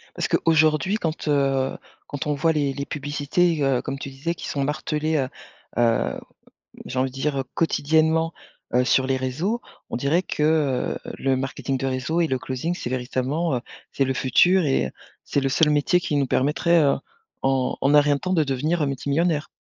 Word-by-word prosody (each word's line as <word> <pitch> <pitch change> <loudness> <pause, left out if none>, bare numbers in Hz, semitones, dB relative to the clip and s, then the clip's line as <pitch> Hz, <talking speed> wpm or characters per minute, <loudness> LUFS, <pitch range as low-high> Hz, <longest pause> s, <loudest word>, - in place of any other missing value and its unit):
Parce - - -1
qu'aujourd'hui 160 +4 +3
quand, 160 -6 -3
heu, 135 -2 +1 0.3
quand 145 +1 -5
on 150 - +1
voit 160 +3 +2
les 140 -2 0
les 140 +1 -4
publicités, 145 +3 0
heu, 135 -2 +2
comme 135 0 -5
tu 140 - -6
disais 140 +6 -4
qui - - -7
sont 140 - -1
martelées, 150 +2 -1
heu, 130 -2 0 0.5
heu, 115 -1 +1 0.7
j'ai 130 - -4
envie 130 0 +1
de 130 - -18
dire, 140 +1 -1
heu, - - -3
quotidiennement, 160 +1 +2 0.4
heu, 125 0 +4
sur 130 0 +3
les 135 - +1
réseaux. 155 - -2 0.3
On - - -2
dirait 145 +8 +1
que, 150 - -3 0.6
heu, - - -7
le 135 -1 +1
marketing 135 0 -3
de 135 - -2
réseau 130 +6 -1
et 165 - +3
le 130 -3 -1
closing 130 +8 -3
c'est 120 - -5
véritablement, 130 +5 -1
heu, - - -2 0.3
c'est 135 - +1
le 130 0 -1
futur 175 +9 +4
et 135 - +1
heu, - - -5 0.3
c'est 140 - 0
le 135 - 0
seul 150 +3 +3
métier 150 +5 +3
qui 155 -4 -2
nous 140 -2 +2
permettrait, 160 +6 +2
heu, 140 - +3 0.5
en 135 -1 +1
en 140 +2 +3
un 150 - +9
rien 145 0 +2
de - - -8
temps 185 - -2
de 160 - +3
devenir, 150 +5 0
heu, - - +2
multimillionnaire. 145 +3 0
145 Hz, 200 wpm, -23 LUFS, 135-160 Hz, 0.7 s, un